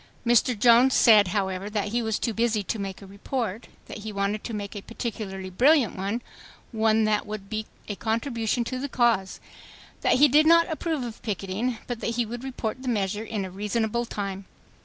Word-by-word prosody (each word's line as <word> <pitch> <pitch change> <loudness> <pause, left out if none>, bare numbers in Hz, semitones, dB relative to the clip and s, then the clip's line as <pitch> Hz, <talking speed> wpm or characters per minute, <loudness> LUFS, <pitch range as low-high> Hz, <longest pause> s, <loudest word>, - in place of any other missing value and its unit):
Mr. 240 0 +3
Jones 240 +4 +5
said, 215 -4 +7
however, 190 0 -2
that 210 -1 -2
he 240 +3 0
was 220 -2 -1
too 230 - -2
busy 220 -2 +1
to 215 - -3
make 195 0 -5
a - - -9
report; 210 +2 -4 0.2
.that - - -8
he 215 +1 -6
wanted 200 +1 -2
to - - -5
make 205 -1 -5
a 205 - -5
particularly 195 -4 -5
brilliant 260 - +4
one, 200 +5 -3 0.5
one 220 -1 +2
that 215 -1 +1
would 210 -1 -7
"be 215 0 -3 0.2
a 210 - -3
contribution 230 +1 -1
to 255 +2 -4
the 280 +2 -4
cause"; 230 -7 +1 0.6
that - - +3
he 290 +3 +7
did 300 +3 +5
not 335 0 +6
approve 315 -2 -2
of 235 -2 -7
picketing, 210 +3 -2
but 245 -2 -4
that 235 - -2
he 240 0 +1
would 240 +3 -7
report 255 -2 -4
the 260 - -7
measure 210 -2 -1
"in 210 -3 -3
a 185 - -8
reasonable 220 +4 -1
time." 200 -3 -5
220 Hz, 200 wpm, -26 LUFS, 200-240 Hz, 0.6 s, said